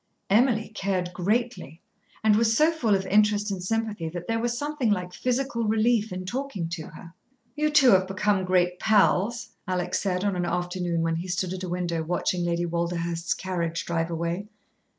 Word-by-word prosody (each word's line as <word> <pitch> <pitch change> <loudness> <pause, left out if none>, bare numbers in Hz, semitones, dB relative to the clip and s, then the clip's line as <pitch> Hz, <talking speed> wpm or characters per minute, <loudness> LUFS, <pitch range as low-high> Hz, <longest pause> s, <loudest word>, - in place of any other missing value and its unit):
Emily 220 0 +3
cared 185 -3 -2
greatly, 205 - -1 0.4
and 215 -1 +5
was 225 +1 +3
so 310 +2 +5
full 235 -11 +1
of 190 0 -1
interest 210 +1 +3
and 190 -2 -3
sympathy 215 -4 -2
that 175 +1 -6
there 225 0 0
was 240 +1 -1
something 290 -3 -1
like 180 -3 -1
physical 250 -2 -1
relief 220 0 +2
in 185 0 -5
talking 240 -5 -3
to 165 -2 -5
her. 165 +2 -12 0.4
"You 305 0 +1
two 295 -4 +6
have 190 -1 +4
become 195 0 +1
great 180 -1 +1
pals," 220 +2 +2 0.2
Alec 180 -1 -2
said, 185 -1 0
on 200 -2 0
an 180 - -1
afternoon 175 -1 -1
when 165 0 0
he 175 +3 -5
stood 180 0 -2
at 185 - -6
a 180 - -4
window 175 -2 -1
watching 175 +2 -1
Lady 170 0 0
Walderhurst's 170 0 -2
carriage 170 -3 -3
drive 165 -1 -1
away. 170 +4 -3
185 Hz, 180 wpm, -26 LUFS, 175-220 Hz, 0.4 s, two